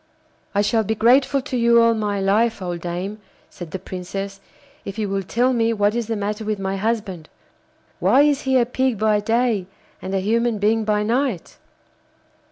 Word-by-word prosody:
'I 200 - +4
shall 220 +2 +1
be 220 +2 -1
grateful 260 +5 +3
to 275 -2 -5
you 235 -1 +4
all 230 0 +5
my 210 -2 -2
life, 215 +4 +1
old 175 -2 -4
dame,' 180 +5 -4 0.3
said 175 -3 -9
the 190 - -4
Princess, 195 +2 -6 0.4
'if 200 +1 -7
you 215 -2 -1
will 195 0 -1
tell 240 +7 +1
me 230 -1 +1
what 205 -1 +1
is 235 -2 -2
the 225 - -2
matter 210 +1 -3
with 215 -1 -2
my 195 0 -3
husband. 200 -5 -3 0.7
Why 280 - +4
is 290 -1 +2
he 265 -1 +2
a 240 - +3
Pig 255 -1 -1
by 215 0 +2
day 225 -3 0 0.3
and 190 +1 -4
a - - +2
human 230 +3 0
being 215 +2 +1
by 210 -1 +1
night? 235 -4 -1
215 Hz, 185 wpm, -21 LUFS, 195-235 Hz, 0.7 s, all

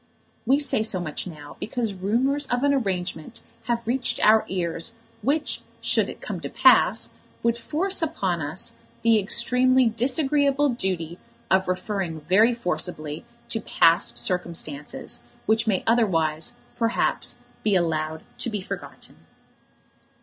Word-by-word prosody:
We 270 +3 +5
say 285 -6 +2
so 215 -4 +1
much 170 0 -4
now 150 -4 -10
because 225 -2 -2
rumours 250 +10 0
of 245 +1 0
an 285 0 +4
arrangement 190 - -2 0.2
have 235 0 -1
reached 245 +2 0
our 220 +1 +5
ears, 180 +4 -1 0.3
which, 290 +7 0 0.2
should - - +1
it - - -9
come - - -5
to - - -6
pass, - - +4 0.3
would 235 0 +3
force 345 +11 0
upon 195 - -1
us 150 +5 -4 0.3
the 230 -1 +5
extremely 250 +5 +3
disagreeable 280 +4 +2
duty 185 -8 -2 0.3
of 190 0 +3
referring 185 -3 -2
very 195 +10 +4
forcibly 155 -6 -2 0.2
to 225 - -2
past 165 -11 +3
circumstances, 155 0 -2 0.2
which 220 +2 +2
may 195 -4 +1
otherwise, 165 -9 +2 0.2
perhaps, 230 0 0 0.3
be 210 -2 +2
allowed 160 -2 0 0.2
to - - -2
be 210 -2 -3
forgotten. 185 - -8
215 Hz, 130 wpm, -25 LUFS, 170-245 Hz, 0.3 s, We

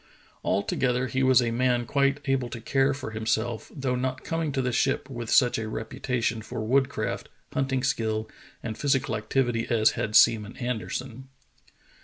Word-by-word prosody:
Altogether 125 +5 0
he 130 +2 -1
was 130 -2 +5
a 115 - 0
man 120 0 +1
quite 140 +2 +1
able 135 -3 0
to 120 - -6
care 135 +4 +2
for 135 -4 -5
himself, 110 +1 -2
though 135 -3 -2
not 130 +1 -2
coming 165 -2 -2
to 135 - -2
the 125 -1 0
ship 135 +2 +1
with 120 -2 -5
such 125 -2 +4
a 110 - -3
reputation 115 +1 -2
for 110 - -6
woodcraft, 115 -5 0 0.2
hunting 135 -1 0
skill, 110 -4 0 0.4
and 110 -2 -5
physical 135 -5 +1
activity 115 +2 0
as 110 -2 +4
had 110 0 -3
Seaman 110 -1 +5
Anderson. 125 +1 -4
125 Hz, 160 wpm, -27 LUFS, 115-135 Hz, 0.4 s, was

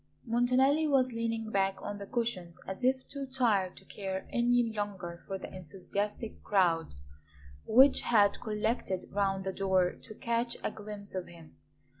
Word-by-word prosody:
Montanelli 255 +6 +3
was 260 -3 +3
leaning 230 -1 -2
back 195 -1 +1
on 205 0 -5
the 200 - -7
cushions 200 -8 -2
as 190 +6 -6
if 260 +1 +2
too 280 -1 -5
tired 225 -8 +1
to - - -13
care 190 -2 -4
any 245 0 +3
longer 190 -5 -4
for 195 - -3
the - - -9
enthusiastic 200 +5 -4
crowd 170 - +2 0.7
which 265 +4 +6
had 205 -4 +3
collected 210 -3 -1
round 195 -1 0
the 190 0 -3
door 190 -2 +2
to 215 - -12
catch 235 0 -1
a - - 0
glimpse 205 -1 -6
of 185 -1 -3
him. 165 -2 -14
205 Hz, 155 wpm, -31 LUFS, 190-240 Hz, 0.7 s, which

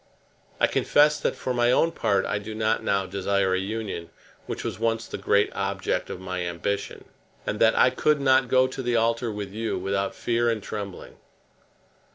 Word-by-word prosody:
I - - +5
confess 150 +1 +3
that - - -1
for 130 - -3
my 120 0 +3
own 165 +6 +3
part 100 -10 +1
I 100 - -1
do 110 +1 -7
not 110 +1 0
now 100 -1 +1
desire 95 0 0
a 95 - +1
union 100 -4 -4 0.4
which - - -4
was - - -4
once 115 0 0
the - - -6
great 100 0 +2
object 100 0 -2
of - - -6
my 95 -1 -4
ambition, 90 +3 -3 0.4
and 105 - -2
that 110 0 +4
I 125 - +5
could 150 +3 +2
not 130 -2 +4
go 130 +1 +4
to 130 +1 -5
the 120 -1 0
altar 115 0 +1
with 105 -2 -5
you 110 +2 -2
without 100 0 -2
fear 120 0 +1
and 110 -3 -2
trembling. 100 -3 -7
110 Hz, 190 wpm, -25 LUFS, 100-120 Hz, 0.4 s, I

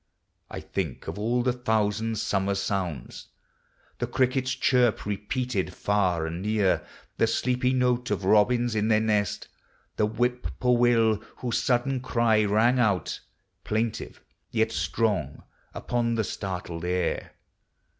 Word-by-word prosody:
I - - -6
think 80 -9 -4
of - - -5
all 120 +3 +1
the 125 0 +1
thousand 110 -2 0
summer 100 -1 0
sounds. 90 -10 -3 0.7
The - - -1
cricket's 130 0 +1
chirp, 125 -3 +2
repeated 105 -1 -2
far 95 -5 +1
and 85 +2 -4
near; 105 -2 +1 0.3
The - - +3
sleepy 125 +1 +1
note 125 -1 +1
of 95 - -1
robins 120 +4 +3
in 110 0 +1
their 110 -1 +4
nest; 105 -3 0 0.5
The 105 - +2
whippoorwill, 120 -1 +2 0.2
whose 120 -2 -1
sudden 130 +1 +1
cry 115 -4 +2
rang 110 +5 +3
(nit. 105 -7 +1 0.4
Plaintive, 110 +1 -2 0.3
yot - - +1
strong, 110 -4 -1 0.3
upon 115 -1 -1
the 110 - +1
startled 90 -5 -5
air. 90 0 -1
110 Hz, 125 wpm, -26 LUFS, 100-125 Hz, 0.7 s, their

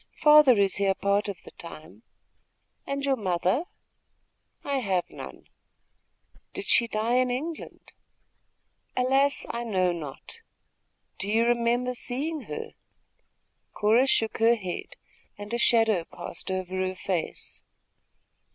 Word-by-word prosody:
"Father 300 -5 +7
is 195 -1 +3
here 195 -1 +2
part 200 +2 0
of 195 - -7
the - - -12
time." 170 +4 -11 0.9
"And 280 0 -2
your 275 -1 +2
mother?" 190 - 0 1.0
"I 280 -1 -1
have 190 -7 0
none." - - -10 1.1
"Did - - -5
she 235 - +4
die 225 +3 0
in 255 0 +2
England?" 300 +6 -6 1.1
"Alas, 270 +2 +2
I 235 - -4
know 185 -6 +1
not." 150 -6 -8 0.8
"Do 195 - -2
you 225 +2 +3
remember 240 +1 +1
seeing 285 +6 -2
her?" 455 0 -5 1.0
Cora 225 +5 +3
shook 225 -4 +1
her 230 +1 +5
head, 185 -5 -6 0.4
and 205 +2 -8
a 235 - 0
shadow 225 -6 +3
passed 175 - -8
over 185 0 -3
her 185 0 -1
face. 185 -3 -4
225 Hz, 125 wpm, -27 LUFS, 190-255 Hz, 1.1 s, Father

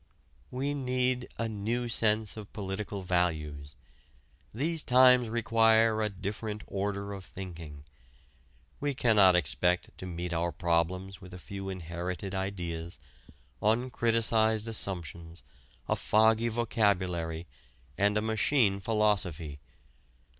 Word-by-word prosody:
We 135 +3 -2
need 125 -2 -1
a 115 - -1
new 115 +3 -2
sense 110 -2 +2
of 105 -2 -9
political 100 0 -4
values. 80 -5 -1 0.8
These 155 +7 0
times 125 -2 +5
require 115 -1 +3
a 105 - +1
different 105 +2 -5
order 100 0 -3
of 95 -1 -8
thinking. 85 -6 -9 1.0
We 145 -1 -1
cannot 105 -7 +5
expect 90 +2 +1
to 95 - -6
meet 85 0 -4
our 85 +1 0
problems 85 +3 -1
with 90 0 -10
a - - -7
few 95 +2 -7
inherited 90 +1 -5
ideas, 85 -4 -4 0.6
uncriticised 115 -1 +2
assumptions, 85 -5 -4 0.4
a - - +1
foggy 110 +2 +3
vocabulary, 95 -8 0 0.5
and 100 +1 +2
a 105 - 0
machine 110 -1 +2
philosophy. 95 -8 0
100 Hz, 110 wpm, -30 LUFS, 90-115 Hz, 1.0 s, times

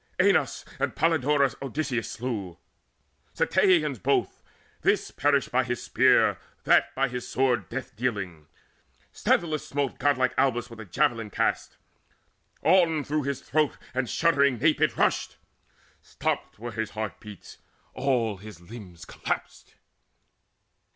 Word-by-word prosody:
Aenus - - +2
and - - -1
Polydorus 145 -4 +2
Odysseus 135 -4 -2
slew, 110 -8 -4 0.8
Ceteians 155 - +2
both; - - 0 0.4
this - - +1
perished 140 -1 +1
by 130 +1 +3
his 120 -1 -3
spear, - - +4 0.2
That - - +3
by 135 +1 +2
his 125 -1 -5
sword 130 -2 0
death 135 -1 -6
dealing. 100 -10 -3 0.7
Sthenelus 155 -3 +1
Smote 140 -2 -2
godlike 130 -3 +2
Abas 120 -2 +1
with 115 - -11
a 110 - -7
javelin 115 - 0
cast: - - -1 0.9
On 165 -3 +4
through 150 0 -2
his 140 -2 -2
throat 155 -1 0 0.2
and 125 -2 -1
shuddering 140 -6 +3
nape 155 +6 +2
it - - +2
rushed: - - +1 0.6
Stopped - - -3
were 120 +2 -6
his 110 -1 -3
heart 110 -2 -4
beats, 105 -3 -12 0.3
all 125 -6 0
his 105 -2 -11
limbs 90 -2 -11
collapsed. - - -5
130 Hz, 125 wpm, -26 LUFS, 110-145 Hz, 0.9 s, spear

